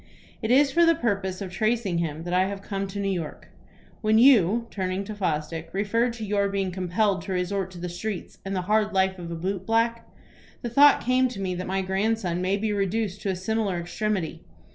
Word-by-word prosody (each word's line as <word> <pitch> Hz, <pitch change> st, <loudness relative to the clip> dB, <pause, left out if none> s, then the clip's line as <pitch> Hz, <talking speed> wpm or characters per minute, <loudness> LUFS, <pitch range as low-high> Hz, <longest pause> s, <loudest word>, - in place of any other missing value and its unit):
It 220 Hz, -, -2 dB
is 275 Hz, +3 st, +5 dB
for 340 Hz, +3 st, +4 dB
the 335 Hz, 0 st, +5 dB
purpose 200 Hz, -, -1 dB
of 190 Hz, -2 st, -5 dB
tracing 215 Hz, -2 st, 0 dB
him 160 Hz, -1 st, -3 dB
that 175 Hz, +1 st, -4 dB
I 185 Hz, +1 st, +4 dB
have 200 Hz, 0 st, -6 dB
come 195 Hz, -1 st, -3 dB
to 195 Hz, +1 st, -6 dB
New 195 Hz, -1 st, 0 dB
York. 170 Hz, -5 st, -5 dB, 0.5 s
When 215 Hz, -1 st, +3 dB
you," 230 Hz, -3 st, +5 dB
turning 190 Hz, 0 st, -2 dB
to 215 Hz, +2 st, -6 dB
Fosdick, 165 Hz, -4 st, -2 dB
"referred 230 Hz, +5 st, +1 dB
to 225 Hz, -2 st, -6 dB
your 200 Hz, -1 st, +1 dB
being 195 Hz, -1 st, -1 dB
compelled 185 Hz, +2 st, 0 dB
to 195 Hz, -, -4 dB
resort 185 Hz, +1 st, -1 dB
to 185 Hz, -, -12 dB
the 175 Hz, +1 st, -4 dB
streets, 180 Hz, +3 st, -5 dB
and 195 Hz, 0 st, -3 dB
the 185 Hz, -, 0 dB
hard 215 Hz, +2 st, +1 dB
life 190 Hz, -1 st, +1 dB
of 170 Hz, -1 st, -6 dB
a 170 Hz, -, -4 dB
boot 185 Hz, +3 st, -3 dB
black, 230 Hz, +1 st, +1 dB, 0.5 s
the 240 Hz, -, -3 dB
thought 285 Hz, +4 st, +6 dB
came 255 Hz, +1 st, +3 dB
to 240 Hz, -5 st, -7 dB
me 190 Hz, -2 st, -2 dB
that 180 Hz, +1 st, -4 dB
my 190 Hz, +1 st, -1 dB
grandson 190 Hz, -2 st, 0 dB
may 190 Hz, +2 st, +1 dB
be 210 Hz, +1 st, -1 dB
reduced 200 Hz, 0 st, -1 dB
to 200 Hz, -, -2 dB
a 190 Hz, -, 0 dB
similar 200 Hz, 0 st, -1 dB
extremity. 180 Hz, 0 st, -2 dB
195 Hz, 215 wpm, -26 LUFS, 185-220 Hz, 0.5 s, thought